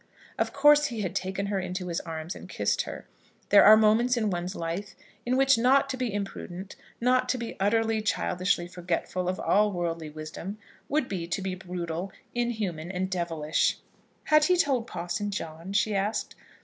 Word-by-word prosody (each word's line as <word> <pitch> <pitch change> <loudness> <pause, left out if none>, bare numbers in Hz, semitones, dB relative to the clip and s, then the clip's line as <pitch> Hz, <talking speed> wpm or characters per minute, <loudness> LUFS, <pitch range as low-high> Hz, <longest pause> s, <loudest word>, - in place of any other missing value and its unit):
Of - - +1
course 295 +1 +5
he 230 -3 -4
had 185 -4 -2
taken 195 +2 -2
her 200 -1 -1
in 180 -1 -4
his 180 -2 -2
arms 165 +1 -6
and - - -10
kissed - - 0
her. - - -8 0.4
There 205 - +8
are 215 +1 +9
moments 225 +3 +4
in 215 -3 +1
one's 180 +2 -3
life 170 +4 -4 0.3
in 255 +1 +2
which 270 -3 +5
not 275 +3 +4
to - - -2
be 250 -3 -1
imprudent, 195 -2 -5 0.2
not 255 +1 +2
to 255 - +1
be 235 -1 -5
utterly, 220 +2 +2
childishly 185 -3 0
forgetful 180 0 -2
of 185 - -2
all 210 +2 +3
worldly 165 -3 -3
wisdom, 155 +6 -7 0.3
would 295 -3 +1
be 175 -4 -4
to 180 +3 -2
be 190 -1 -2
brutal, 180 0 -5 0.2
inhuman, 215 -9 -2
and 190 0 -2
devilish. 165 -4 0 0.5
"Had 305 -1 +5
he 360 +2 +3
told 260 -8 +1
Parson 205 +1 -3
John?" 165 -2 -6
she 205 +1 +1
asked. 200 +2 -1
195 Hz, 175 wpm, -27 LUFS, 175-230 Hz, 0.5 s, are